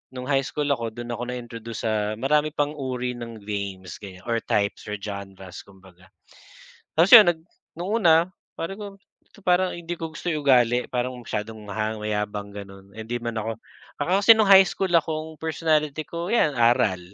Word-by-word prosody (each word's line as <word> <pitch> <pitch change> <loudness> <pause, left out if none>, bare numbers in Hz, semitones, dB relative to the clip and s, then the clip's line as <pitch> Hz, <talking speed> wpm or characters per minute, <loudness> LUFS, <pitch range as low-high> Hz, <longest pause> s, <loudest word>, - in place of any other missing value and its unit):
no'ng 125 0 -6
high 135 -1 +3
school 145 +2 -2
ako, 115 -5 -2
do'n 120 0 -6
ako 120 +1 -4
na-introduce 115 -2 -7
sa 110 -1 0
marami 150 +6 +1
pang 145 0 0
uri 125 -3 -3
ng 115 -3 -8
games, 100 -4 -5
ganyan 95 -3 -11
or 115 -1 0
types, 100 +1 -1
or 105 - -3
genres, 95 -2 -8
kumbaga. 95 -2 -19 0.9
Tapos 175 +4 +5
yun 215 -5 +11
nag 170 - -4 0.4
no'ng 180 +3 -4
una, 165 -3 +7 0.4
sabi 165 +4 -4
ko 200 -1 -8 0.5
parang 180 +1 +3
hindi 175 0 -6
ko 165 -1 -6
gusto 165 - -6
yung 155 -3 -2
ugali, 125 -2 +4
parang 125 0 -2
masyadong 110 0 -5
mahang 110 +1 -3
mayabang, 105 -1 -3
ganon. 100 -1 -11
Eh, 110 - -9
hindi 115 +2 -4
man 115 -1 -3
ako 110 +1 -3 0.5
ako 145 - -2
kasi 205 - +4
no'ng 215 -3 +3
high 190 -1 +9
school 190 +1 -2
akong 160 -1 0
personality 155 -2 0
ko, 170 +2 -5
yan, 215 -9 +3
aral. 115 -5 +3
120 Hz, 180 wpm, -24 LUFS, 105-155 Hz, 0.9 s, yun